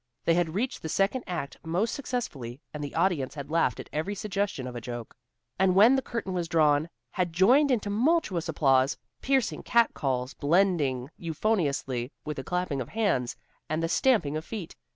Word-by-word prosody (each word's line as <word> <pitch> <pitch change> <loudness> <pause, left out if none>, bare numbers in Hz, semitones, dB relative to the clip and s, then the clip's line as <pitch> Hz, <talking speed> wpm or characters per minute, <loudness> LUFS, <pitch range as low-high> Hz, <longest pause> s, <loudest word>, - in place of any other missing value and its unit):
They 165 - +4
had 170 -1 0
reached 245 +6 -1
the 160 - -5
second 200 +9 +1
act 170 -6 -4
most 180 +8 0
successfully, 150 - -4
and 150 -1 -5
the 145 - -6
audience 165 -7 +1
had 140 0 -7
laughed 165 -8 +2
at - - -7
every 160 +7 -2
suggestion 200 -8 -2
of 125 -1 -6
a 120 - -5
joke, 120 -1 -7 0.4
and 190 -1 +4
when 220 +7 +7
the 265 - +1
curtain 230 -7 -4
was 175 -2 -1
drawn, 155 -1 +3 0.2
had 180 -2 -1
joined 245 - +5
in 250 -4 +3
tumultuous 205 - +1
applause, 135 -3 +3 0.2
piercing 265 -4 +1
cat 235 -1 +3
calls 130 -1 -2
blending 150 -5 +1
euphoniously 150 - -1
with 150 -1 -4
the 135 - -4
clapping 180 -6 -1
of 120 - -6
hands, 200 - 0 0.3
and 155 +2 -1
the - - +2
stamping 190 - +2
of 155 - -3
feet. 195 -3 -7
170 Hz, 180 wpm, -28 LUFS, 140-205 Hz, 0.4 s, when